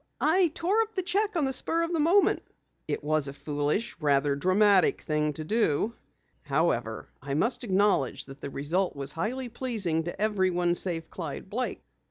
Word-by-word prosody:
"I 355 +3 +4
tore 390 +7 +2
up 445 0 -4
the 375 - 0
cheque 400 +3 0
on 315 -4 +2
the 265 - -1
spur 330 +5 0
of 335 +1 -2
the 330 - +1
moment." 345 +7 +4 0.5
"It - - -3
was 155 -1 +1
a 140 - -6
foolish, 150 +9 -2
rather 140 -2 +2
dramatic 190 +5 +3
thing 150 -1 0
to 155 - -6
do. 215 +2 +1 0.5
However, - - -1
I 140 0 -3
must 230 - 0
acknowledge 195 - +1
the 135 +1 -8
result 165 +8 -1
was 140 0 -1
highly 245 - -3
pleasing 205 -11 -1
to 175 - -6
everyone 185 -5 +1
save 170 -2 0
Clyde 165 +2 -6
Blake." 250 +4 -3
185 Hz, 170 wpm, -28 LUFS, -, 0.5 s, I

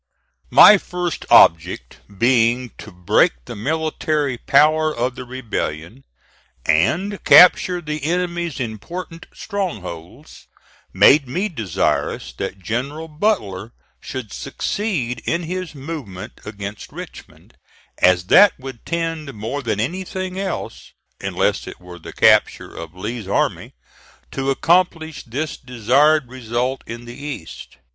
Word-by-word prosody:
My 210 - +8
first 180 -2 -4
object 85 +2 +4 0.2
being 120 +1 +2
to 110 - -10
break 90 -1 +2
the - - -8
military 150 +2 -1
power 155 +2 +3
of 125 -2 -2
the 125 0 -8
rebellion, 120 - -5 0.6
and 180 - +1
capture 180 +3 +6
the 150 -2 -5
enemy's 175 -2 -2
important 165 - -6
strongholds, 125 - -6 0.4
made 135 +9 +5
me 185 +12 -2
desirous 95 - -2
that 100 - -4
General 130 - -4
Butler 120 - -2 0.3
should 130 -6 -7
succeed 145 - -3
in 170 +1 -1
his 180 0 -5
movement 135 - -8
against 100 0 -7
Richmond, - - -12 0.5
as 90 -1 +4
that 200 - +7
would 130 -3 -10
tend 165 -3 -3
more 115 +7 -4
than 110 -5 -2
anything 185 - -4
else, 195 -2 -5 0.3
unless - - -1
it - - -9
were 90 -1 -12
the - - -10
capture - - +3
of 85 +1 -9
Lee's 105 +2 -5
army, 100 - -1 0.6
to 135 0 -2
accomplish 160 0 +1
this 150 +6 -4
desired 130 +4 +2
result 125 +1 -3
in 115 +1 -8
the 120 - -9
East. 145 - -8
135 Hz, 120 wpm, -20 LUFS, 110-165 Hz, 0.6 s, My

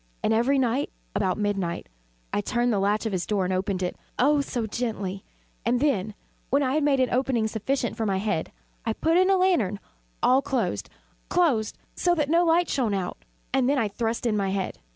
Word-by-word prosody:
And 220 - +3
every 245 +5 +3
night, 260 +2 +1 0.3
about 185 -3 +1
midnight, 195 -5 -1 0.5
I - - +1
turned 240 +3 +1
the 200 - +1
latch 205 +3 +1
of 220 - -1
his 185 -2 -2
door 200 -3 +1
and 185 - -1
opened 185 0 -1
it 180 - -2 0.2
oh 285 +3 +4
so 245 -4 -2
gently! 205 -4 -3 0.4
And 240 +2 +2
then, 215 -8 0 0.3
when 280 +2 +3
I 260 0 +1
had 305 0 +2
made 285 -2 +3
an 255 - +2
opening 250 -3 +1
sufficient 235 +3 -1
for 225 -1 -1
my 195 -1 +1
head, 190 -5 -1 0.3
I 225 - 0
put 325 +8 +1
in 370 +1 +5
a - - +5
dark 375 - +2
lantern, 235 - +2 0.4
all 260 +2 +5
closed, 270 -1 -2 0.4
closed, 280 -12 +2 0.3
that 340 -5 +2
no 340 +1 +5
light 340 +1 +3
shone 230 -7 0
out, 185 -2 -3 0.3
and 265 -1 +3
then 285 - +2
I 225 -5 +1
thrust 230 +3 -2
in 225 -3 +2
my 200 -2 0
head. 190 -1 -2
230 Hz, 205 wpm, -26 LUFS, 200-275 Hz, 0.5 s, in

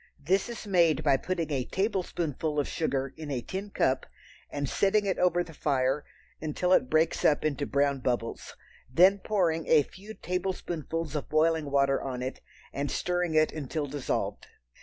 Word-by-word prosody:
This 190 +10 +1
is 235 -1 -7
made 170 -6 +3
by 140 -2 +4
putting 170 +1 -3
a 135 -3 0
tablespoonful 170 - -1
of 145 - 0
sugar 135 -4 -1
in 155 -2 -7
a 130 -4 -2
tin 195 - -5
cup 130 -8 +1 0.4
and 145 -1 -3
setting 205 +7 +2
it 190 - 0
over 175 -1 +3
the 165 - -12
fire 135 -1 0 0.4
until 160 +4 +1
it 130 - +3
breaks 160 +1 +2
up 150 0 +3
into 145 -1 -1
brown 140 -1 +1
bubbles, 120 -2 -3 0.4
then 185 +8 +6
pouring 175 -6 0
a 155 -2 +6
few 205 +9 -12
tablespoonfuls 170 -4 -3
of 145 - -3
boiling 155 -1 +2
water 140 -1 +2
on 125 -2 -4
it 130 - -5 0.3
and 140 0 -2
stirring 180 -2 -1
it 155 0 +4
until 150 0 -3
dissolved. 140 -1 -3
155 Hz, 165 wpm, -29 LUFS, 140-180 Hz, 0.4 s, then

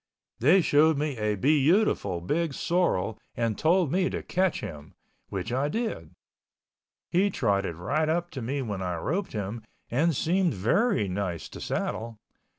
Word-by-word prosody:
They 160 +11 +5
showed 155 -1 +4
me 145 -1 -1
a 105 0 0
beautiful 140 - +2
big 150 - -1
sorrel 115 - 0 0.2
and 115 -2 0
told 170 - +2
me 180 +1 +2
to - - -4
catch 185 -1 0
him, 75 -8 -8 0.3
which 100 +4 -4
I 135 +3 +1
did. 150 - -3 1.0
He 190 +4 +3
trotted 100 - 0
right 150 - 0
up 175 +2 -1
to 135 -5 -6
me 135 +4 -2
when 100 -5 -4
I 90 -1 -2
roped 175 - -2
him 105 +2 -4 0.3
and 155 +6 +2
seemed 175 - +1
very 175 - +2
nice 90 -4 -3
to - - -9
saddle. 115 0 -3
135 Hz, 155 wpm, -27 LUFS, 100-170 Hz, 1.0 s, They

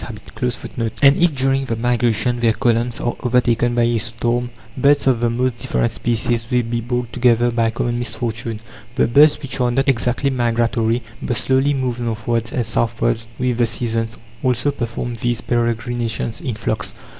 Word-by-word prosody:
(8) 120 +3 -5 0.2
And 140 0 +7
if, 170 -4 +3
during 135 +1 +1
the 115 - -2
migration, 120 0 +1
their 115 -1 +3
columns 120 -1 0
are 120 - -1
overtaken 120 -1 +2
by 120 - +3
a 115 -1 +2
storm, 120 +2 -1 0.3
birds 140 +2 +3
of 130 -3 +3
the 120 0 +1
most 125 +1 -1
different 120 -3 0
species 115 0 -1
will 125 -2 +2
be 115 +1 -2
brought 120 0 -3
together 120 -1 +3
by 115 -1 +1
common 120 +1 -2
misfortune. 115 -2 -4 0.3
The 130 - +3
birds 145 +6 +5
which 135 -2 -4
are 125 - +3
not 135 +4 +1
exactly 125 +2 +1
migratory, 115 -1 +1 0.2
but 120 - -1
slowly 135 +4 +2
move 125 -3 -2
northwards 115 0 -2
and 125 -6 -1
southwards 115 +1 0
with 125 -2 -1
the 120 - +4
seasons, 115 0 -2 0.2
also 125 +2 +1
perform 120 -2 -4
these 120 -1 0
peregrinations 120 0 -1
in 130 -9 -3
flocks. 110 -1 -3
120 Hz, 170 wpm, -20 LUFS, 115-125 Hz, 0.3 s, And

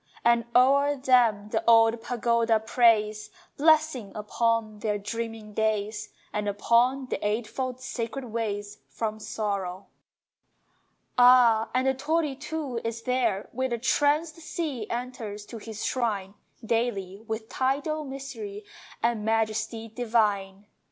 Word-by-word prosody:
And 235 0 +4
o'er 280 +3 +5
them 240 -6 +3
the - - -1
old 225 0 +5
pagoda 235 -1 +1
prays 215 -2 +2 0.3
Blessing 310 -7 +3
upon 215 0 -1
their 210 -1 -1
dreaming 225 0 -5
days, 215 0 -1 0.2
And 210 0 -1
upon 240 +6 +2
the - - -4
eightfold 235 +4 -2
sacred 255 +1 -4
ways 210 -3 -4
From 220 -1 -3
Sorrow! 200 -4 -3 1.3
Ah, 245 -3 +6
and 255 +1 +2
the 265 - +3
torii 300 +1 0
too 285 -4 -4
is 230 0 -4
there 235 -6 0
Where 260 +2 -1
the 240 - -1
tranced 295 +6 +1
sea 305 -8 -4
enters 235 -4 -5
to 230 +1 -9
his 220 0 -6
shrine 205 -6 -1 0.3
Daily, 210 -4 -1
with 220 0 -4
tidal 285 +5 -1
mystery 350 +10 -7 0.4
And 230 -2 +1
majesty 225 +1 -1
divine. 210 -4 0
230 Hz, 120 wpm, -27 LUFS, 215-255 Hz, 1.3 s, Ah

